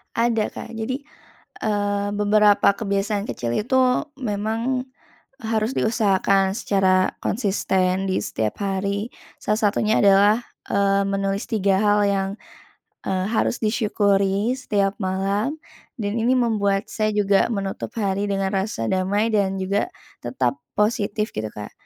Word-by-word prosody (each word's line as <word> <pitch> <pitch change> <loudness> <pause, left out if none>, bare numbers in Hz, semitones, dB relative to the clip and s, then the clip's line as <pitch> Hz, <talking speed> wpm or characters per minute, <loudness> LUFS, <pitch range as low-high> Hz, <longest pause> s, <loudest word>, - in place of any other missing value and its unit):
Ada, 230 -2 +1
Kak. 230 - -8
Jadi, 255 +5 -3 0.6
eee, 205 -1 0
beberapa 210 0 +4
kebiasaan 200 0 -1
kecil 120 -1 -3
itu, 255 +4 +2
memang 230 +3 -2 0.5
harus 220 -1 -1
diusahakan 195 -3 +2
secara 190 -4 +2
konsisten 190 -3 0
di - - +1
setiap 110 -1 -3
hari. 200 +2 -1 0.3
Salah 210 +1 -1
satunya 215 +1 +1
adalah, 205 +3 +5 0.3
eee, 200 0 +2
menulis 195 +1 -1
3 200 -4 +1
hal 210 0 +3
yang, 195 -1 0 0.8
eee, 190 -1 0
harus 230 +1 0
disyukuri 205 -1 +1
setiap 205 -6 0
malam, 195 +9 -1 0.4
dan 205 -1 -2
ini 240 +3 +2
membuat 200 -5 +1
saya 215 -1 0
juga 200 +1 +3
menutup 200 -3 -3
hari 200 0 0
dengan 195 0 -1
rasa 190 - -1
damai 200 - 0
dan 195 -2 +1
juga 195 +2 -1 0.3
tetap 125 +2 -1 0.2
positif 210 0 0
gitu, 110 0 -3
Kak. 105 0 -8
205 Hz, 125 wpm, -22 LUFS, 195-220 Hz, 0.8 s, adalah